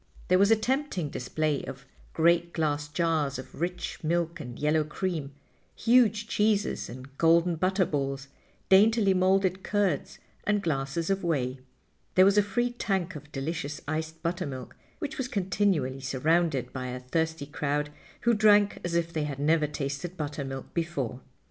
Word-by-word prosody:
There 185 0 +5
was 200 +1 +5
a 225 - +7
tempting 240 - -1
display 150 +3 -1
of 135 +1 -8 0.3
great 170 +1 +3
glass 145 -2 0
jars 155 -3 0
of 130 +3 -10
rich 180 0 -3
milk 170 +1 0
and 125 -5 -7
yellow 150 +1 +2
cream, 155 -2 -3 0.4
huge 225 -3 +3
cheeses 210 -1 +1
and 130 +3 -10
golden 170 +1 +4
butter 185 +3 +2
balls, 140 -2 -2 0.4
daintily 205 +1 +5
molded 190 0 +2
curds 200 -8 0 0.3
and 205 -1 +1
glasses 150 +2 -1
of 195 -1 0
whey. 135 -6 -1 0.6
There 185 - +7
was 200 +1 +5
a - - +6
free 240 +5 0
tank 190 -7 -2
of 150 0 -10
delicious 150 +1 -3
iced 160 +1 -4
buttermilk, 140 -7 -4 0.2
which 295 - -5
was 260 - -1
continually 185 - 0
surrounded 140 0 +1
by 130 -1 -4
a 125 0 -4
thirsty 160 +3 -1
crowd 150 0 -2 0.3
who 235 - +3
drank 210 -2 +4
as 175 -1 -2
if 170 0 0
they 155 -2 -1
had 140 -2 -4
never 150 +2 +2
tasted 145 +5 -4
buttermilk 140 -3 -5
before. 140 -8 -2
165 Hz, 155 wpm, -28 LUFS, 145-190 Hz, 0.6 s, a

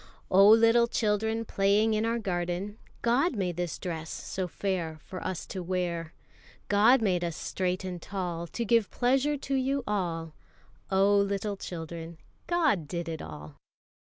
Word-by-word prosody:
Oh, 195 +2 +7
little 230 +1 +6
children, 220 0 0
Playing 205 +2 +2
in 215 +1 +1
our 230 +1 +1
garden, 185 0 -3 0.2
God 255 +6 +2
made 180 -4 -1
this 175 -1 -3
dress 160 -3 -5
so 185 -1 -4
fair 175 -3 -2
For 185 - -7
us 185 -2 -3
to 190 - -5
wear. 170 -2 -2 0.5
God 220 +5 +5
made 180 -4 +1
us 170 -2 -2
straight 185 +4 -2
and 180 -2 -5
tall 175 -3 -4
To 235 +7 -3
give 230 -1 +3
pleasure 270 +4 +1
to 275 0 -4
you 270 +1 0
all. 170 -6 -2 0.6
Oh, 195 +1 +4
little 200 +1 0
children, 165 -2 -7 0.3
God 315 - +2
did 170 +1 -4
it 160 -1 -4
all. 75 -2 -9
195 Hz, 155 wpm, -29 LUFS, 175-225 Hz, 0.6 s, Oh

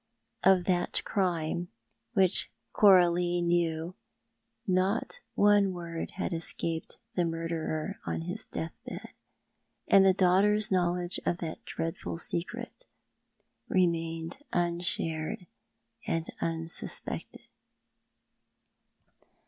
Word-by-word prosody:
Of 190 -2 +5
that 175 -2 +1
crime, 175 -3 -1 0.5
which 190 -2 +5 0.2
Coralie 175 -3 +5
knew, 170 -1 0 0.7
not 190 - 0 0.2
one 205 -2 +4
word 170 -2 -5
had 190 - -2
escaped 165 0 -3 0.2
the 180 - +1
murderer 165 +3 -3
on - - -3
his 180 +6 -5
death 160 - -4
bed; - - -7 0.8
and 195 - +7
the 190 - +6
daughter's 200 +3 +4
knowledge 180 -1 +1
of 170 - 0
that 165 -3 -6
dreadful 165 0 -4
secret 175 - -4 0.8
remained 165 0 0
unshared 170 -1 -1 0.6
and 165 0 -1
unsuspected. 165 0 -3
175 Hz, 90 wpm, -30 LUFS, 165-185 Hz, 0.8 s, and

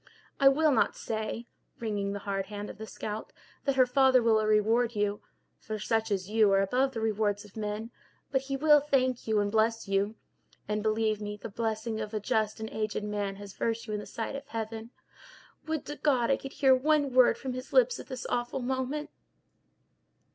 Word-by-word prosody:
I 275 - +6
will 305 +2 +3
not 245 - +2
say," 220 +1 -4 0.3
wringing 205 -3 -2
the 200 - -3
hard 195 -1 -2
hand 205 0 -6
of - - -15
the 220 - -6
scout, 215 0 -6 0.3
"that 275 -2 +1
her 260 -1 +6
father 260 0 +4
will 220 -1 +4
reward 220 +3 +2
you—for 210 +2 -4
such 225 +1 0
as 190 -3 -1
you 215 -1 +4
are 195 - +5
above 255 +7 +1
the 230 - -3
rewards 210 -1 0
of 205 - -17
men—but 220 +5 -5
he 270 0 -3
will 295 +1 +6
thank 260 -4 0
you 220 -1 +2
and 205 0 0
bless 225 +1 +1
you. 195 +2 0 0.5
And, 210 0 -1
believe 215 0 +1
me, 210 0 -4
the 210 - -7
blessing 220 +1 -2
of 215 0 -5
a - - 0
just 215 +1 0
and 220 - -4
aged 215 -1 -2
man 205 -1 -2
has 200 0 -10
virtue 230 -1 -2
in 210 - -1
the 210 - -8
sight 225 +4 -4
of 275 +1 -7
Heaven. 225 0 -5 0.8
Would 315 -2 -2
to 295 - -6
God 260 -4 +2
I - - +3
could 270 - -8
hear 265 -2 +5
one 285 0 +2
word 255 -1 +6
from 260 -2 -4
his 255 +1 -7
lips - - +4
at - - -9
this 255 -1 -6
awful 240 +2 -1
moment!" 265 +4 -2
225 Hz, 195 wpm, -29 LUFS, 210-260 Hz, 0.8 s, I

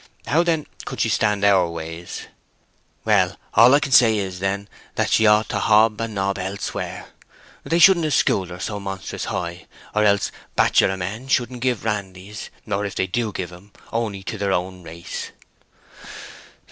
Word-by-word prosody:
How, 150 +8 +3
then, 165 -3 0 0.2
could - - -6
she - - +2
stand 105 -2 +1
our 95 -4 +4
ways?" 85 +1 -7 0.8
"Well, - - +3 0.2
all 120 +4 +7
I - - +5
can 145 -2 -3
say 115 -3 +6
is, 95 -3 -3
then, 100 +1 -2 0.3
that - - 0
she 110 - +4
ought 105 +1 +4
to - - -1
hob 110 0 +4
and 115 -2 -4
nob 100 0 -1
elsewhere. 95 +2 -5 0.5
They 165 - 0
shouldn't 170 -1 +6
have 150 -4 +1
schooled 95 -2 +2
her 90 0 -8
so 105 +2 -4
monstrous 95 -1 -5
high, 85 0 -4 0.3
or 105 - +2
else 100 -1 +2 0.2
bachelor 95 - +3
men 105 +8 -5
shouldn't 125 -2 0
give 125 -4 -1
randys, 100 -1 -4 0.2
or 100 -1 -1
if 100 -2 -4
they - - +1
do 110 +4 -2
give 90 -3 -5
'em, 100 +4 -15 0.2
only 110 -4 -2
to 105 +2 -5
their 100 -1 0
own 90 0 -3
race." 85 +1 -7
100 Hz, 170 wpm, -22 LUFS, 95-115 Hz, 0.8 s, all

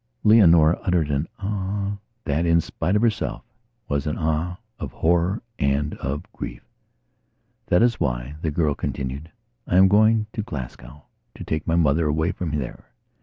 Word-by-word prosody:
Leonora 85 -7 +6
uttered 85 -5 +1
an 70 +3 0
"Ah," 100 0 -3 0.3
that, 75 +3 0
in 85 -1 +4
spite 90 +4 -2
of 105 - +2
herself, 115 -2 0 0.4
was 70 0 -1
an 75 - -2
"Ah" 80 +2 -1 0.2
of - - -5
horror 85 +6 +1 0.2
and 70 +2 +1
of 70 +2 -3
grief. - - -7 1.0
"That 90 - +4
is 120 -1 +2
why," 60 +2 -2
the 80 - 0
girl 75 -1 +1
continued, 70 +4 -4 0.4
"I 90 - +2
am 95 +1 +8
going 110 +2 +4
to 110 - -2
Glasgowto 75 - -8 0.4
take 80 0 -3
my 80 - +2
mother 80 -1 +3
away 80 +4 +1
from 90 -4 -4
there." 65 -4 -6
80 Hz, 155 wpm, -23 LUFS, 75-95 Hz, 1.0 s, am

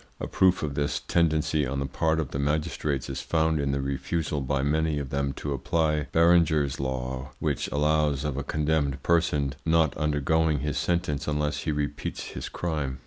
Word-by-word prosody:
A - - -3
proof 95 -2 +3
of 75 -2 -2
this 70 0 -1
tendency 80 -2 +1
on 70 +1 -2
the 70 - -1
part 80 +3 0
of 75 -5 -3
the 70 - -3
magistrates 75 -1 -1
is 65 -1 -4
found 80 -1 +1
in 70 -1 0
the 70 0 -1
refusal 70 +2 -2
by 70 0 0
many 80 +1 +1
of 70 -3 -4
them 70 0 0
to 70 0 -4
apply 75 +2 0
Berenger's 80 -4 +3
law, 65 0 -3
which - - -1
allows 75 -1 +1
of 75 -3 -2
a 70 - -2
condemned 75 -2 0
person 75 -5 +2
not 80 -2 +3
undergoing 75 0 +1
his 75 -1 -1
sentence 85 -4 -1
unless 75 -1 -1
he 80 - +1
repeats 75 -1 -3
his - - -6
crime. 75 -6 -3
75 Hz, 180 wpm, -27 LUFS, 70-80 Hz, -, proof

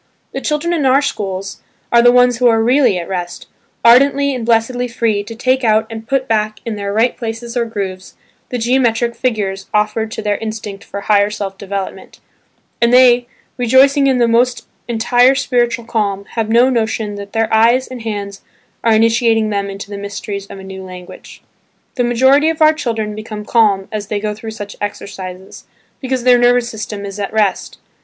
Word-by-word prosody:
The - - -5
children 305 +3 -1
in 320 -4 0
our 270 +2 +4
schools 195 -6 -4 0.3
are 235 - +6
the 245 0 +6
ones 250 -1 +4
who 250 +1 +3
are 225 -1 +4
really 245 -4 +3
at 170 - -5
rest, 175 -2 -5 0.4
ardently 275 +4 +5
and 250 -3 -4
blessedly 235 +2 +1
free 225 -3 -1
to 230 +2 -9
take 255 +3 0
out 220 -1 +3
and 225 0 -8
put 270 -1 0
back 215 -1 -1
in 230 -2 -3
their 200 -1 -4
right 225 +4 +1
places 230 +1 -6
or 240 -1 +1
grooves, 190 -4 -6 0.3
the 250 - -3
geometric 240 -1 +1
figures 200 -6 -2
offered 215 +1 0
to 220 - -5
their 205 -1 0
instinct 215 -2 -6
for 200 - -7
higher 205 0 +3
self 200 -2 -5
development; 195 0 -6 0.6
and 235 0 +3
they, 245 -1 +5 0.3
rejoicing 265 +3 +4
in 265 -2 +2
the 240 -1 +3
most 240 +2 +1 0.2
entire 245 +3 +3
spiritual 240 -3 0
calm, 200 -4 -2
have 225 -2 -2
no 235 +3 +5
notion 220 -3 -1
that 200 0 -9
their 225 -1 0
eyes 235 +4 +4
and 255 -2 -8
hands 200 -3 -5 0.4
are 230 - +3
initiating 225 -1 +2
them 200 -1 -2
into 195 +1 -8
the 200 - -5
mysteries 200 0 -6
of - - -10
a 190 - -10
new 190 0 -8
language. 180 -1 -12 0.5
The 245 - -1
majority 265 +6 +3
of 325 - -3
our 310 0 +6
children 225 -7 -3
become 215 0 -7
calm 205 -5 +2
as 210 -2 -4
they 210 -1 -2
go 210 0 -3
through 215 +2 -8
such 205 -2 -8
exercises, 190 -2 -7 0.3
because 260 -2 -2
their 250 -1 +5
nervous 245 0 +3
system 210 -2 -6
is 200 +1 -7
at 200 - -3
rest. 210 -4 -1
225 Hz, 185 wpm, -16 LUFS, 205-245 Hz, 0.6 s, are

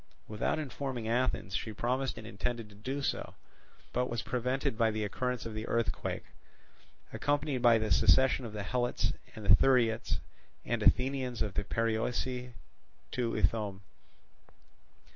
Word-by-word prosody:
Without 105 +6 -1
informing 135 -5 -4
Athens, 115 -5 0
she 110 - -3
promised 125 +3 -1
and 110 - -8
intended 115 +1 -3
to - - -15
do 130 +7 -4
so, - - -2 0.6
but 125 0 +1
was 120 -1 -2
prevented 125 0 -1
by 115 0 +3
the 110 0 -2
occurrence 125 +4 -2
of 115 - -5
the 110 +1 -4
earthquake, 115 0 -1 0.9
accompanied 145 -2 0
by 120 -2 +6
the 110 -1 -1
secession 130 0 +5
of 115 - -5
the 105 -1 -4
Helots 120 +4 0 0.2
and 110 - -8
the 95 - +8
Thuriats 120 -3 +3 0.5
and - - -1
Aethaeans 125 -3 +2
of 105 -3 -3
the 100 - -1
Perioeci 120 +3 -1 0.6
to 120 -2 -1
Ithome. 105 -4 0
120 Hz, 140 wpm, -32 LUFS, 110-125 Hz, 0.9 s, the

